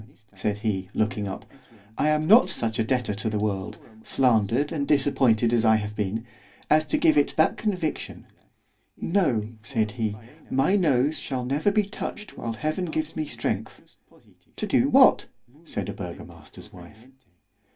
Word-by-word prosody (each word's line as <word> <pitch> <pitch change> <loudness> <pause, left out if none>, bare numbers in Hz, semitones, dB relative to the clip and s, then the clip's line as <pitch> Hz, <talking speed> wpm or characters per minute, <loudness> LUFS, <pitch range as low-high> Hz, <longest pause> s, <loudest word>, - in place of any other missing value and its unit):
said 100 +1 -2
he, 100 -4 -2
looking 105 -1 -1
up—I 110 +3 -6
am 155 0 +1
not 220 +9 +6
such 115 -1 -2
a - - +3
debtor 125 -2 -1
to 110 +2 -3
the 105 - -2
world——slandered 110 +5 -1
and 140 -3 -2
disappointed 125 -5 +3
as 115 -2 +2
I 110 -1 +5
have 105 -1 -3
been—as 115 +8 -2
to - - +1
give 155 -2 +4
it 145 - 0
that 160 - +3
conviction——no! 165 - -3
said 110 -2 -1
he, 110 -2 -3 0.3
my 135 +9 +2
nose 150 -5 +2
shall 130 -3 -4
never 145 +10 +1
be 210 +1 +2
touched 205 +1 -7
whilst 115 -1 -5
Heaven 155 - -2
gives 155 -1 -3
me 155 -1 -3
strength——To - - -7
do - - +2
what? - - +5 0.4
said 100 - -3
a 100 - -4
burgomaster's 90 -3 -10
wife. 90 +6 -14
115 Hz, 140 wpm, -25 LUFS, 105-150 Hz, 0.4 s, not